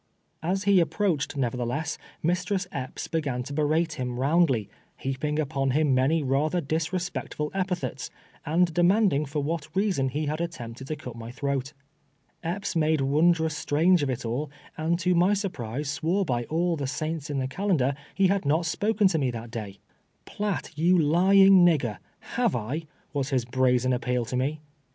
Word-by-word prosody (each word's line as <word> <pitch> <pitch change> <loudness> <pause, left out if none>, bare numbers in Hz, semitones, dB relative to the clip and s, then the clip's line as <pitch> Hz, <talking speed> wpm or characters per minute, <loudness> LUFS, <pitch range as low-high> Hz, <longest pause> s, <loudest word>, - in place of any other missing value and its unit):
As 185 +4 -1
he 200 -2 +5
approached, 170 -4 0
nevertheless, 125 +5 -2 0.2
Mistress 180 +3 0
Epps 130 -2 -5
be 165 - -1
gan 125 -4 -2
to 140 - -7
berate 155 +1 0
him 125 -1 -3
roundly, 135 - +2 0.3
heaping 135 +3 -2
upon 140 -3 0
him 150 -3 +3
many 140 +5 +2
rather 145 +6 +1
disrespectful 160 0 -3
epithets, 180 -8 -2 0.3
and 165 +2 +2
demanding 175 -3 +3
for 145 +1 -3
what 155 0 -3
reason 190 -10 +1
he 150 +4 -2
had 155 +3 -2
attempted 130 -7 -6
to 155 - -2
cut 125 -5 -9
my 115 0 -8
throat. 140 +2 -3 0.7
Epps 180 +3 -3
made 155 -2 +2
wondrous 160 +3 +2
strange 165 +4 +3
of 145 - 0
it 125 -2 -3
all, 130 +6 -2 0.3
and 160 +2 0
to 180 +1 +1
my 180 +4 +4
surprise, 145 - -4
swore 165 +7 0
by 120 -5 -1
all 170 +4 0
the 140 -3 -3
saints 155 +3 -3
in 145 - -2
the 130 -1 -1
calendar 145 -4 +1 0.2
he 195 - +3
had 195 +1 +2
not 155 +4 +1
spoken 210 +5 +1
to 165 -4 +1
me 135 -3 +1
that 115 -1 -6
day. 105 -4 -6 0.3
" - - -44
Piatt, 205 -5 -3
you 175 +4 +3
lying 185 +4 +6
nigger, 135 - +2 0.4
have 240 - +2
I 135 +8 -3
?" - - -37
was 140 -1 -1
his 130 -4 0
brazen 125 0 +2
aj^peal 125 -1 -1
to 125 - -3
me. 145 +4 -1
155 Hz, 175 wpm, -26 LUFS, 130-175 Hz, 0.7 s, lying